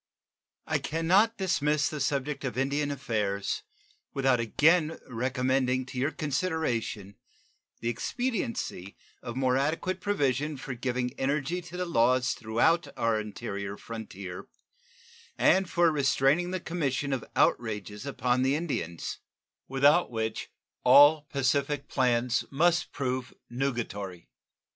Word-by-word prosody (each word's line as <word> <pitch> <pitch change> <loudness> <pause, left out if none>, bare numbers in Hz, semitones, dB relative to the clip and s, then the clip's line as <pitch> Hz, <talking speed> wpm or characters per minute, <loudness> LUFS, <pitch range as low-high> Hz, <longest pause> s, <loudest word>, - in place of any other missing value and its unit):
I - - 0
can 165 +1 -3
not 210 +7 +4
dismiss 150 -6 +1
the 150 - -4
subject 140 +1 -1
of 125 -2 -3
Indian 140 +2 0
affairs 110 - -2 0.5
without 135 -3 +3
again 155 +7 +3
recommending 130 +1 0
to 130 -1 -6
your 135 +3 +2
consideration 145 - -2 0.6
the 115 - -1
expediency 120 - -3 0.2
of 120 -2 -6
more 130 -1 +2
adequate 160 +6 -1
provision 150 - 0
for 130 0 -6
giving 125 0 -2
energy 145 +6 0
to 175 +1 -9
the 180 - -1
laws 125 -5 +2
throughout 120 +10 +1
our 115 -1 +1
interior 100 -2 -5
frontier 100 -5 -8 0.9
and 190 -1 +4
for 170 -1 +3
restraining 145 +3 +2
the 185 0 -2
commission 145 -5 -2
of 125 -4 -2
outrages 105 -2 0
upon 125 -2 0
the 135 +2 +2
Indians, 135 - -3 0.5
without 140 +6 +4
which 110 -2 -3 0.3
all 145 +3 +7
pacific 140 +1 0
plans 125 -2 +1
must 170 +4 +2
prove 130 -2 -3 0.2
nugatory. 115 -8 -3
135 Hz, 120 wpm, -28 LUFS, 120-150 Hz, 0.9 s, all